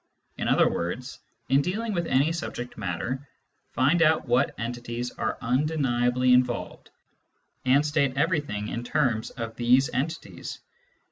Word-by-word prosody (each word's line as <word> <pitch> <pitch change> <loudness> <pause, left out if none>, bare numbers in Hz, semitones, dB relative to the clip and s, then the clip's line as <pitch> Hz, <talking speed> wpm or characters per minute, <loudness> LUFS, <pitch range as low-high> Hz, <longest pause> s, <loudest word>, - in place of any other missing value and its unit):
In - - -3
other - - +4
words, 120 +10 -3 0.3
in 135 +1 +4
dealing 215 +7 -2
with 170 -3 -1
any 140 +5 +3
subject 125 -7 -5
matter, 115 +8 -4 0.4
find 140 +7 +2
out 160 -3 +3
what 125 +3 +2
entities 120 +1 -4
are - - -3
undeniably 125 -2 +2
involved, 125 -1 0 0.8
and 135 +3 +4
state 140 -3 +1
everything 145 - 0
in 120 - -4
terms 120 -4 0
of 115 -2 -6
these 125 +3 +4
entities. 155 +6 -4
130 Hz, 130 wpm, -26 LUFS, 120-150 Hz, 0.8 s, other